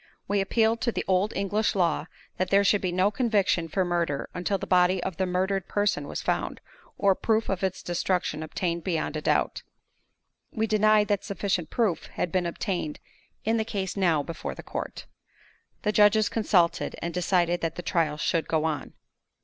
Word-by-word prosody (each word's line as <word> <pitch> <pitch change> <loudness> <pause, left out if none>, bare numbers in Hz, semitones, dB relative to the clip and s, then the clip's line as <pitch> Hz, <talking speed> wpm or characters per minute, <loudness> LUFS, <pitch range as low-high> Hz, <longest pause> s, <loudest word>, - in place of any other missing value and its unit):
We 200 0 +1
appealed 225 +3 +2
to 235 - +1
the - - -3
old 190 +2 +2
English 205 +3 0
law, 165 -4 +1 0.3
that 185 0 0
there 200 +1 +5
should 200 0 +3
be 185 - -1
no 185 +3 +2
conviction 205 -7 +1
for 185 +3 0
murder 170 -5 -1
until 180 +2 -1
the - - -5
body 180 0 +3
of 190 -4 -4
the 190 - 0
murdered 190 +1 0
person 205 -8 0
was - - -5
found, - - -1 0.4
or 200 -1 +4
proof 220 +3 0
of 195 -1 -2
its 190 -1 -2
destruction 175 -2 -1
obtained 170 +2 -2
beyond 160 -4 -1
a 155 - -2
doubt. - - +1 0.9
We 220 -1 0
denied 215 -1 +4
that 205 -2 +1
sufficient 195 -5 -2
proof 205 -10 0
had 175 - -3
been 180 -1 +1
obtained 170 -3 -3 0.5
in 225 +2 +2
the 220 - +1
case 195 -4 -3
now 170 -7 +2
before 165 +3 -6
the - - -9
court. - - -6 0.8
The 210 - +2
judges 210 0 +4
consulted, 185 -6 +1
and 170 0 -4
decided 175 -1 +1
that 165 -1 -2
the 175 - -6
trial 165 -4 0
should 165 +1 0
go 160 -1 +1
on. 155 -4 -2
185 Hz, 180 wpm, -27 LUFS, 170-205 Hz, 0.9 s, there